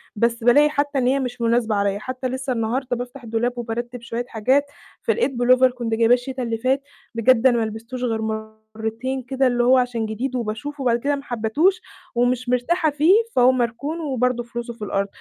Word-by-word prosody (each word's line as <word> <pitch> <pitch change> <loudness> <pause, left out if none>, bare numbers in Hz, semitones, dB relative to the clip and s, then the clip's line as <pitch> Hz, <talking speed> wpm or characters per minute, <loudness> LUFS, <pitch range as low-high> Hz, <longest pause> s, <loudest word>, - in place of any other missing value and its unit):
بس 235 +2 0
بالاقي 285 +6 +6
حتى 290 -1 -1
إن 250 -2 +2
هي 275 +2 +2
مش 250 -2 -4
مناسبة 230 -1 +2
عليّا، 200 0 0
حتى 255 +2 -4
لِسّه 260 +1 -3
النهارده 245 +3 -1
بافتح 245 +2 -7
الدولاب 230 +2 -1
وبارتب 240 +1 -4
شوية 235 +1 -4
حاجات، 255 +5 +2 0.4
فلقيت 460 - +1
pullover 255 +1 +4
كنت 240 -2 -3
جايباه 230 +1 +4
الشتا 255 +1 -2
اللي 230 -1 -2
فات، 260 +4 +1 0.3
بجد 240 +2 +4
أنا 240 - +3
ما 230 - +1
لبستوش 230 +4 -6
غير 225 -3 -1 0.5
مرتين 235 +4 -3
كده، 265 +2 +1
اللي 245 -1 +1
هو 255 +2 +5
عشان 245 -3 0
جديد 240 +5 -3
وباشوفه، 245 +5 -4
وبعد 240 -2 +2
كده 285 +4 0
ما 280 - -7
حبتوش، 280 - +1 0.3
ومش 245 +1 +1
مرتاحة 310 +7 +1
فيه، 300 +5 +4 0.2
فهو 250 +1 +6
مركون، 255 +6 -2
وبرضه 250 -5 0
فلوسه 235 0 -6
في 230 - -21
الأرض، 195 0 -1
245 Hz, 190 wpm, -22 LUFS, 230-260 Hz, 0.5 s, بالاقي